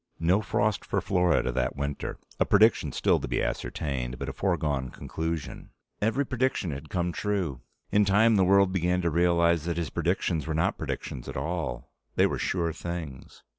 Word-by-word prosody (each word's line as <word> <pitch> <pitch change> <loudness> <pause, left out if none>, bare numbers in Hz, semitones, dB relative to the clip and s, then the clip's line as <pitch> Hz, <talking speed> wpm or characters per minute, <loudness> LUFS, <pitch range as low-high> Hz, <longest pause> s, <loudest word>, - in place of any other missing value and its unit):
No 90 +5 +3
frost 105 0 0
for - - -1
Florida 90 -8 +2
that - - -1
winter 70 0 -4 0.2
a - - +4
prediction 110 +2 +4
still - - +2
to - - -5
be - - -1
ascertained, 65 -1 -3
but 70 +1 -4
a - - -5
foregone 75 -9 -1
conclusion. 80 +3 -5 0.3
Every 115 +7 +1
prediction 130 -9 0
had 70 +2 -7
come 90 -1 -1
true. 90 - -2 0.3
In 105 - +5
time, 105 +3 +4
the 95 - +4
world 100 0 +5
began 90 0 +1
to 85 - +1
realize 85 -1 +3
that 85 -1 -2
his 85 -2 -2
predictions 80 -5 0
were 80 - -1
not 80 - 0
predictions 60 - -5
at - - -5
all: 80 +5 -3 0.2
they - - +5
were - - -1
sure 85 -3 0
things. 80 -6 -7
85 Hz, 175 wpm, -27 LUFS, 75-95 Hz, 0.3 s, In